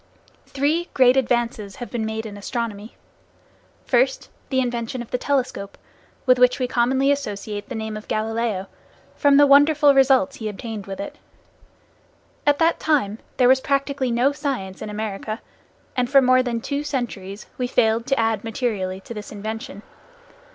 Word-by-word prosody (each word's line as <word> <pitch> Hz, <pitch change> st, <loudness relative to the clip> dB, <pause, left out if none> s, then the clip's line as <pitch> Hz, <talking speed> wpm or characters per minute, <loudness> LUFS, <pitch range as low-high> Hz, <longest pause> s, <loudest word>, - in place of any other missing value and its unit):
Three 305 Hz, +5 st, 0 dB
great 255 Hz, -1 st, +6 dB
advances 235 Hz, -5 st, 0 dB
have 245 Hz, -, -8 dB
been 225 Hz, -3 st, -2 dB
made 220 Hz, 0 st, -4 dB
in 210 Hz, -2 st, -7 dB
astronomy. 215 Hz, 0 st, -5 dB, 0.9 s
First, -, -, +1 dB, 0.2 s
the 260 Hz, -, +1 dB
invention 240 Hz, 0 st, -2 dB
of 235 Hz, -, -17 dB
the 250 Hz, -, -1 dB
telescope, 255 Hz, -8 st, -2 dB, 0.5 s
with 255 Hz, -2 st, +5 dB
which 250 Hz, 0 st, +5 dB
we 255 Hz, -, -1 dB
commonly 260 Hz, +3 st, +2 dB
associate 210 Hz, -6 st, -4 dB
the 255 Hz, -, -5 dB
name 220 Hz, -1 st, -4 dB
of 215 Hz, -, -8 dB
Galileo, 220 Hz, -2 st, -1 dB, 0.5 s
from 285 Hz, -2 st, +4 dB
the 290 Hz, -, +7 dB
wonderful 290 Hz, +1 st, +6 dB
results 265 Hz, -6 st, +4 dB
he 220 Hz, -2 st, -4 dB
obtained 210 Hz, -1 st, -7 dB
with 195 Hz, -1 st, -6 dB
it. 200 Hz, -, -7 dB, 1.3 s
At 290 Hz, 0 st, +5 dB
that 330 Hz, +2 st, +2 dB
time 230 Hz, -9 st, +1 dB, 0.2 s
there 250 Hz, -, +5 dB
was 260 Hz, +1 st, +5 dB
practically 275 Hz, -1 st, 0 dB
no 240 Hz, +4 st, +2 dB
science 265 Hz, -10 st, -4 dB
in 215 Hz, -, -5 dB
America, 215 Hz, +1 st, -4 dB, 0.6 s
and 245 Hz, -1 st, 0 dB
for 275 Hz, 0 st, +7 dB
more 255 Hz, -1 st, +5 dB
than 240 Hz, -2 st, -2 dB
two 285 Hz, +3 st, -2 dB
centuries 215 Hz, -8 st, -4 dB
we 250 Hz, -, 0 dB
failed 230 Hz, 0 st, +2 dB
to 270 Hz, -1 st, +1 dB
add 225 Hz, -2 st, +1 dB
materially 205 Hz, -5 st, -2 dB
to 235 Hz, -, -8 dB
this 210 Hz, -2 st, -8 dB
invention. 215 Hz, +1 st, -6 dB
240 Hz, 160 wpm, -22 LUFS, 215-270 Hz, 1.3 s, the